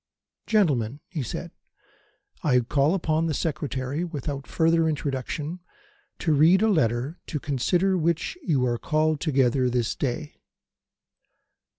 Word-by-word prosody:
"Gentlemen," 145 - +2
he 165 -5 -3
said, 120 - -5 0.9
"I 125 -4 +3
call 140 +7 +2
upon 165 -2 0
the 155 - -1
Secretary, 140 -1 -2
without 145 -4 -5
further 165 0 +2
introduction, 150 +3 -3 0.6
to 160 - +1
read 165 +7 +5
a 220 - +4
letter, 130 - 0
to 150 - -3
consider 175 +8 +1
which 170 - 0
you 145 - +1
are 120 -1 0
called 155 -1 +1
together 130 -4 +2
this 120 -2 0
day." 145 +3 -4
150 Hz, 120 wpm, -25 LUFS, 130-165 Hz, 0.9 s, read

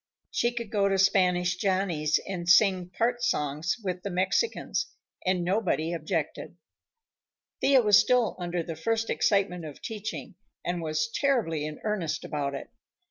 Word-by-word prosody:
She 235 - +1
could 235 -3 -6
go 200 -2 +2
to 195 - +1
Spanish 185 -2 +3
Johnny's 180 -6 +1
and 175 -3 -4
sing 185 -2 +5
part 240 +6 0
songs 150 - 0
with 180 -2 -3
the 200 - -4
Mexicans, 190 - 0 0.4
and 185 -1 +2
nobody 175 -3 0
objected. 160 -2 -3 1.0
Thea 270 -3 +5
was 210 -2 +7
still 245 -5 +2
under 175 -1 -2
the 165 -1 -6
first 225 +7 -1
excitement 195 -4 +1
of 150 -3 -8
teaching, 215 -1 -6 0.3
and 175 0 -2
was 155 -1 -1
terribly 165 - 0
in 155 - -8
earnest 170 -7 -2
about 140 -2 -2
it. 140 - -8
185 Hz, 145 wpm, -28 LUFS, 165-210 Hz, 1.0 s, was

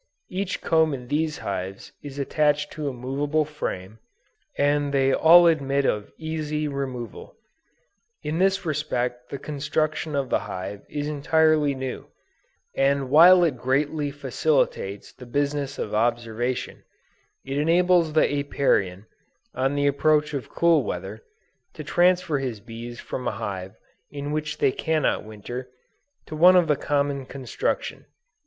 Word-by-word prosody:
Each 190 +1 -2
comb 160 -3 +2
in 125 -2 -10
these 155 +1 0
hives 95 0 -5
is 140 -1 -9
attached 150 +1 +1
to 150 -2 -4
a - - -4
movable 140 +5 -1
frame, 110 -9 -5 0.6
and 145 0 +2
they 135 -1 +2
all 170 +4 +7
admit 140 -4 +2
of 105 -4 -1
easy 155 -1 -3
removal. 130 -6 -6 0.9
In 155 +2 -2
this 195 0 +2
respect 125 -5 -2
the 140 - -5
construction 150 +2 -2
of 140 -2 -2
the - - +3
hive 95 +2 -6
is 145 0 -3
entirely 150 0 +2
new, 130 -1 -5 0.7
and 135 -1 +1
while 175 +4 +8
it 155 -7 +1
greatly 145 +4 0
facilitates 140 -7 -1
the 125 - -12
business 140 +1 -1
of 105 - -4
observation, 120 +2 -1 0.6
it 135 +2 -2
enables 170 +1 +3
the 155 - +4
Apiarian, 100 -9 0 0.5
on 135 +2 0
the 145 0 +1
approach 150 +2 +2
of 140 -3 -4
cool 170 -2 +3
weather, - - -5 0.5
to - - -7
transfer 175 -4 +2
his 125 -5 -4
bees 115 +2 -9
from 125 - -5
a - - +1
hive 95 0 -5 0.3
in 145 0 -5
which 155 0 -3
they - - +3
cannot 155 +2 0
winter, 115 +4 -7 0.6
to 155 - -7
one 180 +4 +7
of 175 -2 +5
the 150 - +3
common 140 -1 -1
construction. 415 - -3
145 Hz, 140 wpm, -24 LUFS, 125-155 Hz, 0.9 s, while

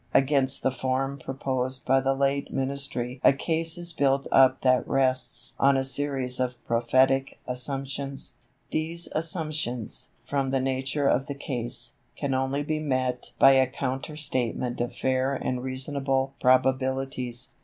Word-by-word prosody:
Against 135 -1 +2
the 130 - +2
form 130 +2 -2
proposed 130 -1 -3
by 135 0 +4
the 135 +1 +1
late 140 +1 0
Ministry 135 -2 -3
a - - +7
case 160 +3 0
is 175 -1 -3
built 135 -1 +2
up 130 0 +5
that 130 -1 +3
rests 130 -3 0
on 140 0 +5
a 135 - +1
series 135 -2 -1
of 125 -1 0
prophetic 130 +3 +2
assumptions. 135 +2 -3 0.4
These 165 +2 0
assumptions, 155 - -2 0.2
from 135 -2 -1
the 135 0 +1
nature 135 +2 0
of 135 - +2
the 140 - -4
case, 125 -4 -2 0.2
can 140 -1 -2
only 135 +2 0
be 155 +1 -1
met 130 -4 -1
by 135 - +8
a 130 -1 +5
counter 135 +3 -4
statement 125 -4 -2
of 120 - -3
fair 130 +1 0
and 125 -1 -2
reasonable 135 +1 -1
probabilities. 130 -1 +1
135 Hz, 145 wpm, -26 LUFS, 130-140 Hz, 0.4 s, by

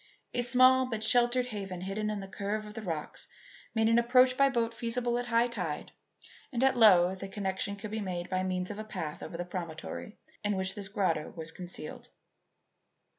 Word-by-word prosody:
A 245 - +1
small 255 +1 +5
but 225 -3 -3
sheltered 240 +2 +4
haven 195 -6 -5
hidden 200 +3 -2
in 210 -1 -3
the 195 - -7
curve 205 +2 -3
of 210 - -9
the 225 - -6
rocks 165 -7 -5 0.5
made 220 0 +3
an 230 +1 +5
approach 250 +2 +5
by 275 +1 +5
boat 235 -3 0
feasible 240 +1 -1
at 245 - -4
high 235 0 +3
tide; 180 -11 -4 0.6
and 250 -1 0
at 265 -1 +4
low 190 -6 +7
the 190 +1 -6
connection 195 0 -3
could 205 +1 -7
be 220 0 -2
made 180 -3 -3
by 185 0 0
means 185 0 -2
of 205 - -7
a - - -3
path 175 -8 -5
over 165 - -6
the 175 - -3
promontory 175 +3 -6 0.3
in 205 -1 +1
which 190 0 -1
this 200 -2 -6
grotto 180 -6 0
lay 160 - -5
concealed. 175 -4 -6
210 Hz, 195 wpm, -30 LUFS, 185-235 Hz, 0.6 s, low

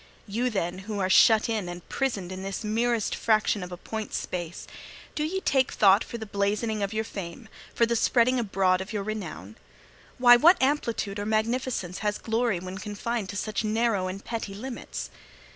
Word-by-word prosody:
You, 235 +5 -1
then, 185 -4 -2
who 210 - -2
are 185 -1 +1
shut 220 +2 +6
in 215 -6 -2
and 175 0 -8
prisoned 205 -10 -2
in 185 0 -6
this 195 +2 -4
merest 230 +1 0
fraction 215 -2 +2
of 180 0 -7
a 180 - -6
point's 220 +4 -4
space, 175 -2 -5 0.5
do 300 - -2
ye 375 +5 -2
take 265 -5 +2
thought 200 0 +5
for 235 - -7
the 220 - -6
blazoning 210 +2 -1
of 200 0 -1
your 220 0 -1
fame, 195 0 -7 0.3
for 235 - +4
the 235 0 0
spreading 245 +2 +3
abroad 190 -4 +1
of 190 +2 -7
your 210 -2 -2
renown? 180 - -6 0.6
Why, 245 -1 +8
what 340 +9 +6
amplitude 235 -7 0
or 205 - -3
magnificence 220 -4 -1
has 210 -1 -1
glory 225 -4 0
when 185 +2 -7
confined 210 0 -3
to 205 - -5
such 215 +1 -2
narrow 215 -3 +1
and 190 +2 -6
petty 225 -4 -4
limits? 240 +4 -6
215 Hz, 185 wpm, -27 LUFS, 195-235 Hz, 0.6 s, Why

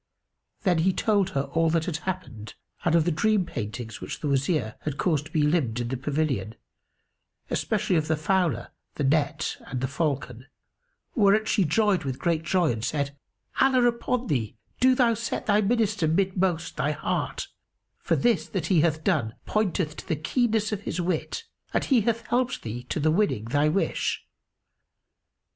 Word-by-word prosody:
Then 180 -5 +3
he 185 +3 +3
told 200 -3 +2
her 135 - +2
all 165 0 +3
that 165 0 +1
had 165 -4 -2
happened 150 - -6 0.3
and 170 -1 +3
of 165 -2 +4
the 175 - +2
dream 205 +4 +2
paintings 115 -1 -6
which - - -5
the 150 - -3
Wazir 135 -4 +1
had 145 -2 -4
caused 155 -4 0
to - - -19
be 155 -2 +2
limned 145 -7 +1
in 120 -1 -2
the 130 - -1
pavilion; 135 -6 -1 1.0
especially 210 -3 0
of 155 -1 0
the 160 - +1
fowler, 180 +1 0 0.2
the 145 - -2
net 150 +2 +1
and 130 - -3
the 130 - -1
falcon: 140 -4 -2 0.7
whereat 215 -2 +4
she 200 -4 +2
joyed 195 +4 +2
with 130 -2 -3
great 165 0 0
joy 170 -1 +2
and 115 -2 -4
said, 140 +1 -1 0.4
"Allah 260 -2 +4
upon 240 +1 0
thee, 115 - -2 0.2
do 255 0 +5
thou 240 -2 +4
set 220 - -3
thy 210 0 +3
Minister 215 -4 +1
midmost 185 0 0
thy - - +1
heart, - - -2 0.5
for - - +1
this 240 -1 +2
that 185 -6 -3
he 165 - +5
hath 155 -1 +1
done 140 - +1
pointeth 185 -7 0
to - - -9
the 165 - +1
keenness 220 - 0
of 205 -2 -2
his 180 - -4
wit 175 - -2 0.3
and - - +2
he 255 -5 +4
hath 230 +2 -1
helped 250 +1 0
thee 120 +2 -5
to - - -1
the 155 +1 +3
winning 170 - +1
thy 145 +6 +2
wish. 195 +6 -1
165 Hz, 175 wpm, -26 LUFS, 140-205 Hz, 1.0 s, do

